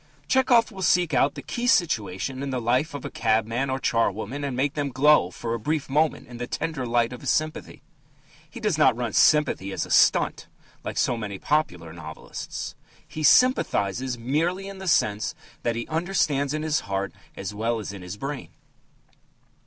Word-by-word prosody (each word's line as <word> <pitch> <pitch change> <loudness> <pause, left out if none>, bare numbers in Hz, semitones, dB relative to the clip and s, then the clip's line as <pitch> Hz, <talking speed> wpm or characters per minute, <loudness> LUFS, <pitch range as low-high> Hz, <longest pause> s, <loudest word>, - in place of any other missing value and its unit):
Tchehov 250 -3 +4
will 195 -2 -8
seek 175 -3 +3
out 135 +2 +3
the - - -7
key 245 0 -3
situation 120 - +1
in 140 - -3
the 130 -1 -1
life 125 +7 0
of 140 - -6
a - - -5
cabman 115 +3 0
or 130 - 0
a - - -8
charwoman, 115 +3 -1
and 135 -3 -3
make 140 +2 +1
them 145 -2 -2
glow 140 -7 +4
for 115 +5 -4
a 115 - -2
brief 150 +5 -1
moment 155 +2 +1
in 120 0 -10
the 120 0 -4
tender 150 -5 -3
light 120 +1 +1
of 125 - -9
his - - -3
sympathy. 155 +1 -2 0.7
He 240 - -9
does 210 -8 0
not 130 -5 +5
run 120 -3 -3
sympathy 145 -10 +3
as - - -2
a - - -10
"stunt" - - +3 0.4
like - - -5
so 125 - +2
many 100 -4 -5
popular 90 - -1
novelists. 80 -2 -7 0.3
He 155 - -7
sympathizes 130 - +3
merely 165 +11 -1
in 195 -1 -8
the 190 - -7
sense 105 -11 +1 0.3
that 120 -1 -1
he 115 - -4
understands 155 -4 0
in 155 - -3
his 155 -1 +1
heart 100 -1 -2 0.2
as 100 +1 -5
well 115 +3 -1
as 105 -2 -6
in 100 - -9
his 90 +2 -7
brain. 135 +4 -5
130 Hz, 190 wpm, -25 LUFS, 115-155 Hz, 0.7 s, not